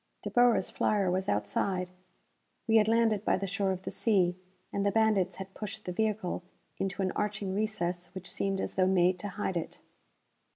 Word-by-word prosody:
De - - -4
Boer's 245 -1 +4
flyer 200 -4 +1
was 185 +1 -1
outside. 180 - 0 0.8
We 225 0 +5
had 215 -1 +4
landed 225 -2 +3
by - - +2
the 195 - -3
shore 195 0 0
of 185 0 -4
the - - -4
sea, 185 -6 +2 0.4
and 200 - 0
the 200 - +3
bandits 200 -4 +2
had 190 0 -8
pushed 215 0 -6
the 180 - -3
vehicle 210 -2 -1 0.4
into 195 0 -1
an 185 - 0
arching 210 -2 -2
recess 185 -4 -1
which 190 0 -6
seemed 195 -1 -1
as - - -3
though 185 -1 +3
made 180 -1 +3
to 205 - -4
hide 190 -2 -2
it. 165 - -5
195 Hz, 190 wpm, -30 LUFS, 185-215 Hz, 0.8 s, We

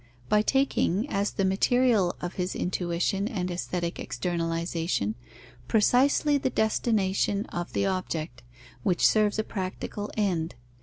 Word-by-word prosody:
By 210 - +4
taking, 260 - +1
as 200 +1 +1
the 195 - -1
material 205 0 +3
of 175 0 -4
his 180 0 -3
intuition 180 +3 -1
and 185 -7 -2
aesthetic 175 0 -3
externalization, 165 - -1 0.5
precisely 275 +6 +3
the 265 - 0
destination 210 -3 +1
of 175 0 -5
the 200 - +1
object, 165 -9 -3 0.4
which 185 -5 +2
serves 215 -1 +2
a 220 - +1
practical 205 +1 -5
end. 175 -6 0
190 Hz, 120 wpm, -27 LUFS, 175-215 Hz, 0.5 s, By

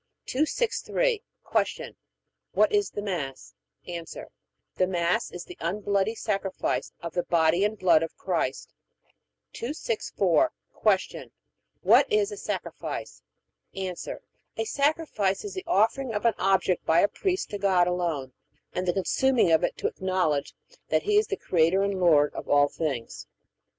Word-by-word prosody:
263. 460 - 0 0.4
Q. - - -8 0.6
What - - +4
is 410 -1 +2
the 205 - -5
Mass? 150 -10 -4 0.3
A. 170 -1 -4 0.7
The 185 - +2
Mass 175 -1 0
is 175 - -7
the 180 - -12
unbloody 200 +4 0
sacrifice 195 -4 -2
of 170 -2 -6
the 180 - +1
body 170 +2 +2
and 210 +1 0
blood 175 -5 +4
of 165 - -4
Christ. - - -2 0.8
264. 235 - 0 0.5
Q. - - -10 0.5
What - - +5
is 425 0 +2
a 415 - -6
sacrifice? - - -5 0.5
A. 190 -1 -3 0.6
A 225 - -1
sacrifice 280 - 0
is 410 - -5
the 375 0 -6
offering 225 +4 +1
of 210 - -2
an 230 - +5
object 190 -1 +2
by 165 +2 +4
a - - +5
priest 375 - -2
to 205 - -4
God 190 -3 +3
alone, 170 -7 -2 0.4
and 180 0 -2
the 175 - +2
consuming 235 +2 +2
of 160 - +4
it - - -1
to - - -7
acknowledge 185 -6 -1 0.3
that - - +2
He 415 0 +2
is 425 - -1
the 400 - -2
Creator 175 +3 +2
and 200 -1 -1
Lord 150 -5 +4
of - - -7
all 145 0 +5
things. 140 -9 -4
190 Hz, 145 wpm, -27 LUFS, 170-235 Hz, 0.8 s, What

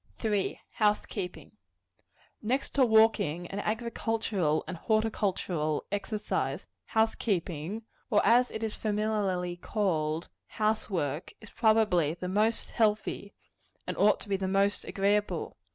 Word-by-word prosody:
3. 210 -4 -1 0.2
House 210 -1 +3
keeping. 180 -4 -6 0.9
Next 255 +5 -1
to 275 - +3
walking, 220 -8 +4
and 195 +3 -4
agricultural 220 -7 -1
and 180 - -5
horticultural 190 -7 0
exercise, 210 +1 -2 0.2
house 220 0 +2
keeping 185 0 -2 0.3
or, 210 - +4
as 245 +2 +5
it 220 - -5
is 220 -1 -2
familiarly 205 -5 -1
called, 165 -6 -1 0.3
house 215 0 +1
work 150 -5 -2
is 215 - -13
probably 210 -9 +3
the 180 +1 -5
most 215 +4 +1
healthy, 210 -2 0 0.5
and - - -3
ought 210 +1 +4
to - - -8
be 195 - +1
the 190 0 -2
most 195 +1 +1
agreeable. 200 -3 0
205 Hz, 125 wpm, -29 LUFS, 180-220 Hz, 0.9 s, as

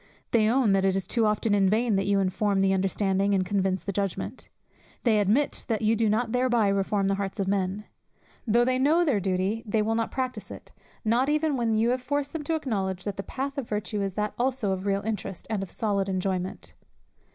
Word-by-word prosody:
They 220 -2 +4
own 245 -3 +3
that 195 -1 +3
it 190 -1 +2
is 195 - -1
too 230 -3 +1
often 210 0 +1
in 195 -2 +4
vain 220 +1 +2
that 195 0 0
you 200 0 +3
inform 195 +1 +1
the 195 0 +3
understanding, 195 +1 +1
and 185 -1 +1
convince 190 -1 0
the 200 - -3
judgment. 195 -1 -3 0.5
They 220 -4 +3
admit 215 +9 +1
that 225 -2 -1
you 220 +1 +3
do 225 -1 +2
not 220 +2 0
thereby 240 -4 +2
reform 195 0 +1
the 195 - +2
hearts 195 +1 -4
of 195 - 0
men. 195 +1 -1 0.6
Though 235 +2 +4
they 255 0 +1
know 315 +6 +3
their 265 -10 +2
duty, 190 +3 -1
they 215 -1 0
will 220 +1 0
not 230 0 0
practice 255 -1 -4
it; - - -10 0.3
no 225 +2 +3
not 265 +3 +1
even 305 -1 +1
when 230 -3 +1
you 225 +2 +2
have 255 0 -1
forced 285 +2 -2
them 320 -2 -4
to 325 - 0
acknowledge 195 - -2
that 205 -2 -4
the - - -2
path 275 +6 -4
of 255 - -6
virtue 210 0 -2
is 195 -2 -2
that 210 0 -1
also 250 -5 0
of 190 +1 -3
real 195 0 0
interest, 210 -3 -4
and 210 -3 0
of 195 - -5
solid 200 -3 -1
enjoyment. 185 -1 -2
210 Hz, 225 wpm, -27 LUFS, 195-240 Hz, 0.6 s, They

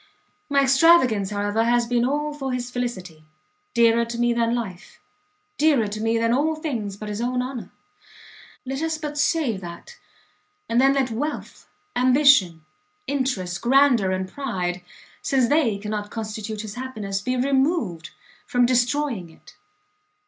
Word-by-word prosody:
My 280 -1 +3
extravagance, 265 - +4
however, 205 +2 0
has 240 +1 +2
been 240 0 +1
all 295 +3 -1
for 270 -3 -4
his 245 0 -4
felicity, 185 -11 -5 0.5
dearer 235 0 +4
to 235 0 -6
me 240 0 +2
than 235 0 +1
life, 200 -6 -6 0.6
dearer 290 -8 +3
to 215 +1 -5
me 225 +1 +1
than 230 +1 +1
all 310 +5 +1
things 235 -11 -4
but 215 - -7
his 210 +1 -4
own 250 +1 -1
honour! 255 -2 -6 1.0
Let 270 +2 -4
us 320 -1 -1
but 300 -1 -5
save 290 - 0
that, 175 - -10 0.7
and 235 +2 +2
then 270 +1 +4
let 265 -3 0
wealth, 290 +7 -5 0.3
ambition, 250 - +4 0.4
interest, 250 -11 -2
grandeur 245 -5 +4
and 185 0 -2
pride, 185 -8 -3 0.4
since 260 -3 +2
they 285 -9 +2
cannot 210 0 -4
constitute 215 -1 -5
his 215 -2 -7
happiness, 215 -6 -4
be 255 +4 -1
removed 265 - 0 0.4
from 245 0 +3
destroying 245 - 0
it. 160 - -18
240 Hz, 145 wpm, -23 LUFS, 210-270 Hz, 1.0 s, extravagance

